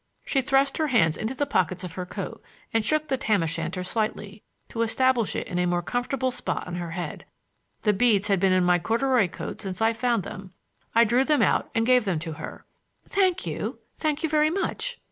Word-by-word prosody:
She 270 - +1
thrust 270 +1 +2
her 310 - +2
hands 170 - +3
into 225 +5 -3
the 285 - 0
pockets 185 - 0
of 180 -2 -6
her 180 0 -5
coat - - -6 0.3
and 225 -1 +2
shook 310 +6 +1
the 270 -2 0
tam 215 -7 +1
o' - - 0
shanter 170 +3 -3
slightly, 210 0 -3 0.3
to 230 - -3
establish 240 0 +2
it - - -2
in 180 - -3
a 180 - +2
more 175 0 0
comfortable 255 +4 -1
spot 245 - -3
on 175 -1 -5
her 175 -1 -4
head. 170 -1 -5 0.6
The 210 - +3
beads 210 -1 +3
had 195 -3 +2
been 190 0 +3
in 185 0 +4
my 180 0 +4
corduroy 230 +3 +2
coat - - -6
since 190 -3 -5
I 225 +1 +3
found 235 -3 0
them. 190 +1 -9 0.4
I 230 - +7
drew 240 +3 +3
them 290 -4 +3
out - - +2
and 225 0 +2
gave 250 -2 +4
them 185 -4 0
to 160 +1 -5
her. 155 - -8 0.4
"Thank 375 -2 +1
you; - - -3 0.2
thank 305 0 -1
you 320 - +1
very 305 0 +3
much." 435 +7 -2
225 Hz, 220 wpm, -26 LUFS, 185-265 Hz, 0.6 s, I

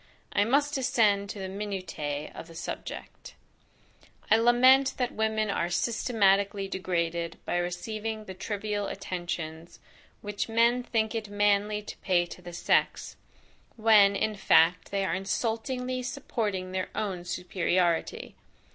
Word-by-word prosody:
I 205 - +3
must 285 +5 +2
descend 215 -7 +2
to - - -6
the 190 -1 -4
minutiae 185 -7 -4
of - - -9
the 165 - -13
subject. - - -7 1.0
I 220 - +8
lament 255 +3 +5
that 250 -2 0
women 220 -1 0
are 170 -3 -1
systematically 200 0 +1
degraded 170 -3 -2
by - - -1
receiving 215 +5 -3
the 190 - -7
trivial 205 +1 -3
attentions, 170 -2 -5 0.4
which 205 +1 -3
men 235 +2 +3
think 220 -2 -1
it 220 -2 -4
manly 205 +1 +1
to - - -9
pay 180 -3 +1
to 175 - -11
the 175 0 -9
sex, 170 - 0 0.6
when, 215 -3 +5
in 215 +2 0
fact, 175 -3 +4
they 195 -1 -1
are 165 - -1
insultingly 240 +6 -2
supporting 220 -7 -3
their 185 0 -2
own 190 -4 -3
superiority. 180 -1 -1
200 Hz, 130 wpm, -28 LUFS, 180-225 Hz, 1.0 s, I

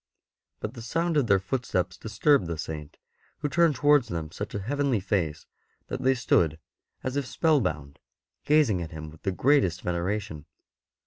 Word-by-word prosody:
But 105 - -4
the 120 - -9
sound 165 +8 -1
of 140 -5 +3
their 100 - +5
footsteps 95 -4 -2
disturbed 110 - +2
the 85 -1 -3
Saint, 75 -1 -6 0.4
who 150 - -2
turned 165 0 +3
towards 145 -2 +4
them 80 -4 -4
such 105 +4 -6
a - - -1
heavenly 140 +1 0
face 90 -6 -1 0.4
that 130 - -4
they 130 0 +3
stood 85 - +2 0.5
as 130 +1 -3
if 140 -2 -1
spellbound, 95 - 0 0.4
gazing 145 - +3
at 80 - -5
him 80 -1 -8
with 80 - -16
the 95 - -1
greatest 130 - +2
veneration. 90 -2 -3
105 Hz, 165 wpm, -27 LUFS, 85-140 Hz, 0.5 s, their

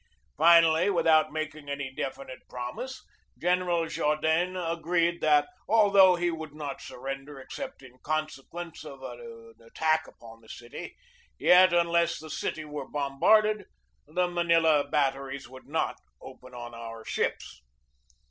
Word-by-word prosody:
Finally, 165 +1 +6
with 190 - +1
out 155 -1 +5
making 155 -1 -5
any 140 -2 -4
definite 135 -1 -6
promise, 125 - -6 0.3
General 180 -1 +1
Jaudenes 160 +4 0
agreed 170 0 0
that, 150 -1 +4 0.2
although 200 -4 +6
he 175 0 0
would 160 -2 -7
not 145 -3 -6
surrender 135 +2 -7
except 265 - -8
in 130 -1 -15
consequence 155 +2 -4
of 135 -3 -10
an 460 - -10
attack 160 - 0
upon 115 -1 -14
the 110 - -19
city, 120 0 -9 0.4
yet, 185 0 +6
unless 170 -1 +2
the 155 0 -9
city 155 - -3
were 145 -3 -6
bombarded, 210 +10 +2 0.4
the 180 +4 0
Manila 165 -3 +3
batteries 135 -2 -1
would 130 +1 -14
not 160 +3 -1 0.2
open 130 -1 -13
on 120 -1 -8
our 115 -1 -8
ships. - - -3
155 Hz, 130 wpm, -28 LUFS, 135-175 Hz, 0.4 s, Finally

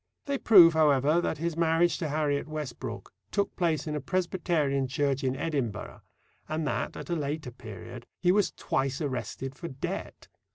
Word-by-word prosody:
They 280 -1 -1
prove, 175 -7 +8
however, 150 +1 +4
that - - -1
his 165 +1 -2
marriage 165 +1 +2
to 160 - -1
Harriet 145 -1 0
Westbrook 150 -5 -6 0.2
took 200 -1 -1
place 170 -3 0
in 155 -1 -3
a 150 - -2
Presbyterian 160 -5 0
church 140 0 0
in 130 0 0
Edinburgh, 135 -8 -3 0.5
and 155 0 -1
that, - - -2
at - - -7
a - - +2
later 150 -3 -3
period, 115 0 -10
he 180 - +4
was 205 +1 +3
twice 135 0 -1
arrested 135 -2 -3
for 170 +5 -7
debt. 130 -4 -5
150 Hz, 165 wpm, -28 LUFS, 135-170 Hz, 0.5 s, prove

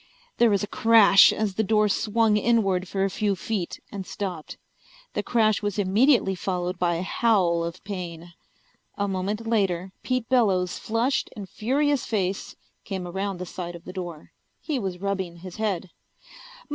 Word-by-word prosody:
There 235 - +6
was 200 -1 +1
a - - -2
crash 220 -2 +6
as 210 -2 -1
the 220 - 0
door 215 +1 +3
swung 215 +2 +2
inward 200 -4 +2
for 195 +1 -1
a 195 - +1
few 205 0 0
feet 190 -2 -4
and 200 -1 -5
stopped. 180 -5 -6 0.6
The - - -1
crash 215 -3 +2
was 205 -1 -2
immediately 205 +2 +3
followed 180 -1 -3
by 175 -1 +1
a 170 - -2
howl 185 -6 +2
of 170 +2 -6
pain. 175 -3 -7 0.6
A 200 - 0
moment 200 +4 -2
later 190 -5 0
Pete 255 -3 -1
Bellows' 195 -8 +2
flushed 230 +5 0
and 200 -2 -7
furious 280 +7 0
face 195 -3 -2 0.3
came 190 -3 -5
around 195 +2 -3
the 180 - -5
side 175 -1 -6
of 170 - -12
the 185 - -8
door. 175 -5 -7 0.3
He 300 -5 -2
was 190 -5 -3
rubbing 190 -2 -3
his 175 +1 -10
head. 195 -5 -2
195 Hz, 165 wpm, -25 LUFS, 180-220 Hz, 0.6 s, There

